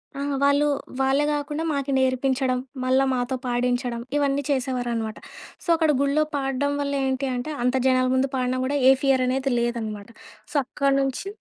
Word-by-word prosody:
ఆ! - - -6 0.2
వాళ్ళు 285 +1 +4 0.3
వాళ్ళే 270 +2 +2
గాకుండా, 295 +2 -2
మాకి 280 -1 -2
నేర్పించడం, 260 0 +1 0.2
మళ్ళా 260 +1 +3
మాతో 250 +1 -1
పాడించడం, 245 -1 -1 0.2
ఇవన్నీ 285 0 +1
చేసేవారనమాట. 245 -4 -2 0.5
సో, - - -13
అక్కడ 320 -1 +1
గుళ్ళో 285 +2 +2
పాడడం 280 +1 -1
వల్ల 280 0 -2
ఏంటి 265 +1 -1
అంటే, 250 +5 -4
అంత 250 - +2
జనాల 255 0 +3
ముందు 265 +1 +1
పాడిన 255 0 0
గూడా, 285 +2 0
ఏ - - +9
ఫియరనేది 265 0 +2
లేదనమాట. 225 -3 -3 0.4
సో, - - -12
అక్కడ 275 +1 0
నుంచి 270 +7 -2
265 Hz, 150 wpm, -24 LUFS, 250-280 Hz, 0.5 s, ఏ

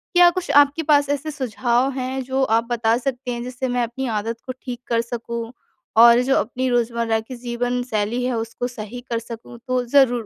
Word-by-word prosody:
क्या 355 0 +8
कुछ 355 -3 -3
आपके 290 +3 0
पास 290 -2 +3
ऐसे 285 +2 -1
सुझाव 255 -1 0
हैं 260 +1 -2
जो 265 +1 0
आप 230 -1 +2
बता 230 -1 +2
सकते 250 0 -3
हैं, 240 0 -4
जिससे 250 +1 -4
मैं 245 -1 0
अपनी 245 +3 -4
आदत 225 +2 -4
को 255 - -4
ठीक 245 -3 -6
कर 230 -1 +2
सकूँ, 235 0 -5 0.5
और 235 +1 +8
जो 270 +2 +2
अपनी 255 +5 -1
रोज़मर्रा 235 -2 +1
की 235 +3 -8
जीवनशैली 245 -1 -2
है 250 -1 0
उसको 230 +2 -3
सही 240 0 -8
कर 230 - +1
सकूँ? 230 +1 -10
तो 255 -1 +1
ज़रूर 245 -3 +3
245 Hz, 195 wpm, -22 LUFS, 235-260 Hz, 0.5 s, क्या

